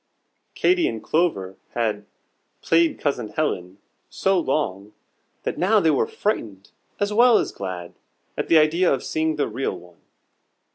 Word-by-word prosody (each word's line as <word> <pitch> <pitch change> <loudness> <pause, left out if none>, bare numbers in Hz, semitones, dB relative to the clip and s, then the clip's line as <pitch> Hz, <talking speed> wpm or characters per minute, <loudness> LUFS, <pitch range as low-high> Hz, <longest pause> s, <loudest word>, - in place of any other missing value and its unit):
Katy 360 -1 +3
and 110 -1 -4
Clover 110 - 0 0.2
had 105 -3 -1 0.6
"played 165 0 +3
Cousin 130 -6 -1
Helen" 95 - -3 0.3
so 190 -1 +1
long, 105 - -2 0.5
that - - -3
now 210 +4 +4
they 160 -5 +3
were 140 - +1
frightened 105 - -3 0.3
as 205 +1 0
well 235 +1 +6
as - - -1
glad 90 -3 -6 0.4
at - - -3
the 165 - +5
idea 165 +4 +3
of 135 - 0
seeing 160 0 -1
the 145 - 0
real 130 -7 -3
one. 90 0 -17
145 Hz, 145 wpm, -23 LUFS, -, 0.6 s, well